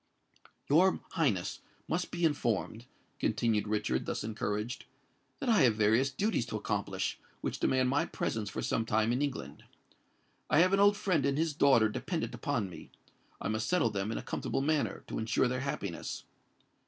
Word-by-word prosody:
"Your 180 +6 +4
Highness 130 - 0 0.3
must 175 +2 -1
be 175 -1 0
informed," 120 -5 -1 0.3
continued 110 -3 +1
Richard, 105 -12 -1
thus - - -2
encouraged, 105 +1 -3 0.5
"that 275 - -4
I 225 -7 +5
have 120 -5 +5
various 110 +5 +3
duties 135 - 0
to 110 - -5
accomplish, - - -2 0.2
which - - -3
demand 130 -1 +2
my 140 +2 +2
presence 110 -2 -3
for - - -4
some 115 - 0
time 110 0 +1
in 125 +3 0
England. 140 -3 -4 0.9
I - - +3
have 185 +2 +4
an 195 - +4
old 205 0 +5
friend 180 -8 +1
and 140 0 +1
his 160 0 +1
daughter 135 -6 +5
dependant 160 - -3
upon 120 -9 -1
me: 90 - -11 0.5
I - - -3
must 110 +1 -1
settle 175 -11 +2
them 100 +1 -2
in - - -2
a - - -5
comfortable 135 - -2
manner, 155 0 0
to - - -4
ensure 110 +3 +2
their 125 +1 -1
happiness. 130 - -4
125 Hz, 170 wpm, -31 LUFS, 110-155 Hz, 0.9 s, I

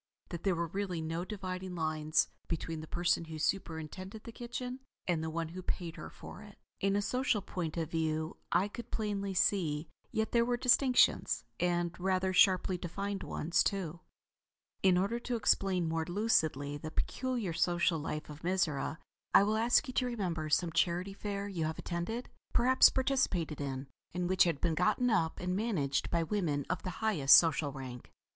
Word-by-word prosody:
That 170 -2 -5
there 190 -3 +1
were 170 0 -1
really 185 0 -3
no 165 +2 -3
dividing 185 -2 -5
lines 155 -1 +1 0.2
between 165 -1 -3
the 155 - -8
person 170 0 +1
who 160 -1 -7
superintended 185 +4 -3
the 230 - -8
kitchen 250 +2 -5 0.3
and 170 -3 +1
the 160 - -2
one 165 0 -3
who 185 +3 -7
paid 170 -2 -3
her - - -8
for - - -11
it, 210 -1 -13 0.2
in 195 0 +1
a 205 - +1
social 255 0 +1
point 175 -4 -4
of 165 -1 -2
view, 160 -1 -1 0.2
I 180 +4 +3
could 235 +3 -8
plainly 200 -3 -2
see; 165 -5 +1 0.2
yet 220 0 -1
there 235 -1 +4
were 240 0 0
distinctions; 250 +1 +4 0.2
and 175 -1 0
rather 185 0 +1
sharply 185 -1 +4
defined 195 +3 -4
ones 165 +1 +1
too. 175 -4 -2 0.8
In 185 -2 +5
order 200 +6 0
to 245 0 -3
explain 190 -5 +2
more 160 0 -1
lucidly 160 -7 +1
the 155 - -6
peculiar 240 +1 -2
social 175 0 +2
life 150 +1 -4
of 150 +1 -10
Mizora, 170 -5 0 0.4
I - - +9
will 210 +2 +1
ask 235 +6 +3
you 255 - -5
to 250 - +1
remember 175 -10 -2
some 165 +3 +2
Charity 180 +4 +1
Fair 200 0 -4
you 175 -6 -2
have 160 0 -3
attended, 200 +8 -3 0.3
perhaps 255 +2 +6
participated 200 - 0
in, 135 -1 -3 0.3
and 180 0 0
which 185 0 +4
had 165 -5 0
been 170 -2 +1
gotten 230 +8 +2
up 165 -7 +1
and 180 0 -1
managed 185 -11 0
by 170 -1 +1
women 160 -6 -1
of 180 - -2
the 185 - -4 0.2
highest 150 -11 +7
social 160 -3 +2
rank. 130 -3 -8
180 Hz, 180 wpm, -32 LUFS, 160-205 Hz, 0.8 s, I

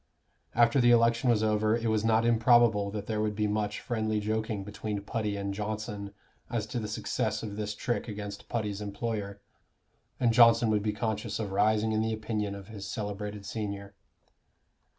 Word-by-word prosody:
After 120 +3 +5
the 120 - +5
election 115 +1 +4
was 110 -2 +3
over 110 +1 +2
it 115 0 -2
was 110 -1 +1
not 115 0 +3
improbable 115 -3 +4
that 105 0 -5
there 110 -1 -1
would 105 -1 -1
be 105 0 0
much 105 0 -1
friendly 110 -2 -1
joking 110 -1 -2
between 105 +1 -4
Putty 105 -1 -2
and 100 0 -3
Johnson 105 -1 -4 0.3
as 115 -3 -1
to 120 - 0
the 110 - -4
success 110 0 -2
of 105 -2 -5
this 105 0 -3
trick 120 - -2
against 105 -1 -7
Putty's 105 -3 -2
employer, 100 -1 -4 0.8
and 120 -3 +3
Johnson 115 -1 +6
would 105 -1 +2
be 105 +1 0
conscious 110 0 -2
of 105 -3 -3
rising 110 +2 +2
in 110 0 +1
the 110 0 0
opinion 110 -2 -2
of 100 -1 -10
his 100 -3 -7
celebrated 105 -1 -5
senior. 100 -2 -5
110 Hz, 175 wpm, -29 LUFS, 105-115 Hz, 0.8 s, Johnson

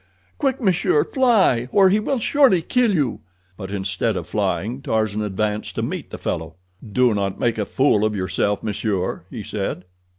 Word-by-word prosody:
Quick, 270 -3 0
monsieur, 235 - +2
fly, 225 - +2
or 195 -2 +5
he 205 +3 +3
will 260 +5 -1
surely 235 - +3
kill 245 +4 +2
you!" 145 - 0 0.4
But 95 -1 -7
instead 95 -1 -1
of - - -4
flying 120 +6 -2
Tarzan 110 -4 -1
advanced 105 +1 -2
to - - -2
meet - - -4
the - - -7
fellow. 80 0 -4 0.4
"Do 125 0 +3
not 100 -2 -2
make 115 -2 0
a 105 - -1
fool 130 -6 +2
of 110 -1 +1
yourself, 95 +2 -1
monsieur," 100 -5 -2
he 110 - -7
said. 100 -3 -4
110 Hz, 170 wpm, -21 LUFS, -, 0.4 s, or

